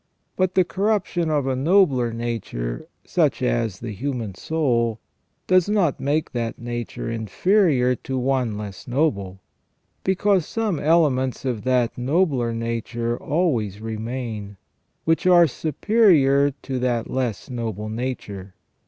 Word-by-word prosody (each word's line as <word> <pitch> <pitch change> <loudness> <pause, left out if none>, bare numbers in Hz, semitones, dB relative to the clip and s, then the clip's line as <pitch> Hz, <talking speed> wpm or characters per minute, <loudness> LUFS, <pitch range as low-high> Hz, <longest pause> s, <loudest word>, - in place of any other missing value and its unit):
Bnt 185 -1 0
the 185 - +5
corruption 190 -3 0
of 145 -3 +1
a 135 -1 0
nobler 135 -5 +3
nature, 115 - -4 0.2
such - - +1
as 95 - 0
the 115 -2 -5
human 115 -1 -4
soul, 115 - 0 0.5
does 185 +1 +3
not 195 -9 +2
make 150 +3 0
that 115 -2 -3
nature 120 -1 -5
inferior 125 - +2
to 130 - -4
one 125 -4 0
less 100 -3 -8
noble, 100 -9 -1 0.6
because 190 -2 +2
some 215 -8 -1
elements 140 -6 +2
of 120 -5 -1
that 125 -2 +1
nobler 135 -3 +1
nature 115 0 -2
always 120 - -1
remain, 110 -2 -5 0.5
which 165 +2 +2
are 175 -2 +7
superior 155 - +3
to 130 -2 -3
that 120 -2 0
less 130 -1 -3
noble 110 -4 -4
nature. 110 -5 -5
125 Hz, 125 wpm, -23 LUFS, 115-160 Hz, 0.6 s, are